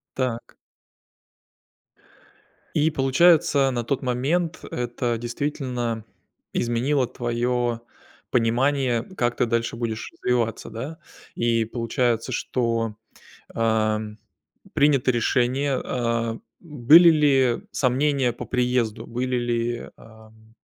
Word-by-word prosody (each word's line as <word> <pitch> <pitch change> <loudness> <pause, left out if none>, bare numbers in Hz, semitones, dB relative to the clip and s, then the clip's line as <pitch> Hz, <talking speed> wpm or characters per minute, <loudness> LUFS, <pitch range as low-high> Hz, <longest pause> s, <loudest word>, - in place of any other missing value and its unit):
Так. 125 -3 -3 2.2
И 155 +1 +3
получается, 140 0 +4
на 120 -2 -2
тот 135 +3 -2
момент, 145 +7 -1
это 120 -1 -2
действительно 120 -2 -3 0.5
изменило 125 +3 0
твое 120 -1 -1 0.5
понимание: 125 0 +1
как 120 -5 0
ты - - +2
дальше 115 0 -1
будешь 115 -2 -4
развиваться, 115 -3 -1
да? 130 +9 -6 0.4
И 115 -1 +1
получается, 120 +1 -1
что, 115 -3 -1 0.6
ам, 110 -1 0 0.6
принято 140 -3 +3
решение, 130 +3 +1
а. 115 -2 -1
М, 115 - -11 0.2
были 155 +2 +6
ли 140 -6 +3
сомнения 135 0 +1
по 115 - -8
приезду, 125 -3 0
были 125 +2 -2
ли, 120 0 -2
ам, 110 0 -18
120 Hz, 95 wpm, -24 LUFS, 115-135 Hz, 2.2 s, были